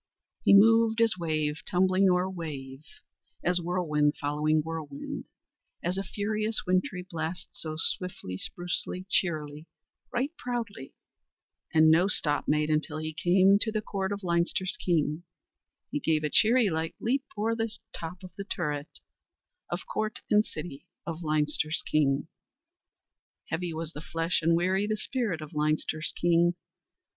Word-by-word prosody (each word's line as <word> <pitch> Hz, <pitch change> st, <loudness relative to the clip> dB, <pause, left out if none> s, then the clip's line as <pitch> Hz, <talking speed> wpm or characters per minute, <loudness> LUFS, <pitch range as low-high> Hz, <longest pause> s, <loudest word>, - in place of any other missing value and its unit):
"He -, -, +7 dB
moved 225 Hz, +2 st, +6 dB
as 230 Hz, -1 st, +5 dB
wave 155 Hz, -2 st, -1 dB
tumbling 185 Hz, +1 st, +3 dB
o'er 180 Hz, +1 st, +2 dB
wave 145 Hz, -7 st, -6 dB, 0.6 s
As 180 Hz, 0 st, +2 dB
whirlwind 155 Hz, -4 st, +1 dB
following 150 Hz, +2 st, +1 dB
whirlwind, 155 Hz, -3 st, -5 dB, 0.6 s
As 175 Hz, +2 st, 0 dB
a 195 Hz, -, -1 dB
furious 215 Hz, +3 st, -1 dB
wintry 185 Hz, 0 st, 0 dB
blast, 165 Hz, 0 st, -4 dB
So 155 Hz, -1 st, -5 dB
swiftly, 165 Hz, -, 0 dB
sprucely, 175 Hz, -, -3 dB
cheerily, 155 Hz, -3 st, 0 dB, 0.4 s
Right 270 Hz, +6 st, -1 dB
proudly, 230 Hz, -, -4 dB, 0.8 s
And 155 Hz, 0 st, +6 dB
no 170 Hz, +4 st, +5 dB
stop 145 Hz, -7 st, +1 dB
made 150 Hz, +1 st, +2 dB
Until 155 Hz, 0 st, 0 dB
he 155 Hz, 0 st, -4 dB
came 190 Hz, +5 st, +4 dB
To 220 Hz, -, +1 dB
the 215 Hz, 0 st, -2 dB
court 195 Hz, -1 st, -2 dB
of 205 Hz, 0 st, -4 dB
Leinster's 175 Hz, +1 st, 0 dB
King, 155 Hz, -2 st, +1 dB, 0.7 s
He 295 Hz, -, -1 dB
gave 155 Hz, -, +1 dB
a 150 Hz, -, -1 dB
cheery 230 Hz, 0 st, +5 dB
light 160 Hz, 0 st, -2 dB
leap 265 Hz, +4 st, 0 dB
O'er 225 Hz, +2 st, +1 dB, 0.4 s
top 175 Hz, +3 st, -5 dB
of 185 Hz, -, -9 dB, 0.2 s
turret, 150 Hz, -4 st, -3 dB, 0.7 s
Of -, -, -4 dB
court 215 Hz, 0 st, -3 dB
and 210 Hz, 0 st, +6 dB
city 155 Hz, -7 st, -8 dB, 0.2 s
Of 165 Hz, 0 st, -5 dB
Leinster's 155 Hz, 0 st, 0 dB
King." 145 Hz, -1 st, +2 dB, 1.2 s
Heavy 170 Hz, +1 st, -2 dB
was 160 Hz, 0 st, -4 dB
the 150 Hz, -, -7 dB
flesh 165 Hz, +2 st, -1 dB
and 165 Hz, +1 st, +3 dB
weary 190 Hz, +4 st, +1 dB
the 215 Hz, 0 st, 0 dB
spirit 210 Hz, -6 st, -2 dB
of 155 Hz, +2 st, -9 dB
Leinster's 155 Hz, +1 st, 0 dB
king. 175 Hz, 0 st, +3 dB
170 Hz, 140 wpm, -28 LUFS, 155-195 Hz, 1.2 s, He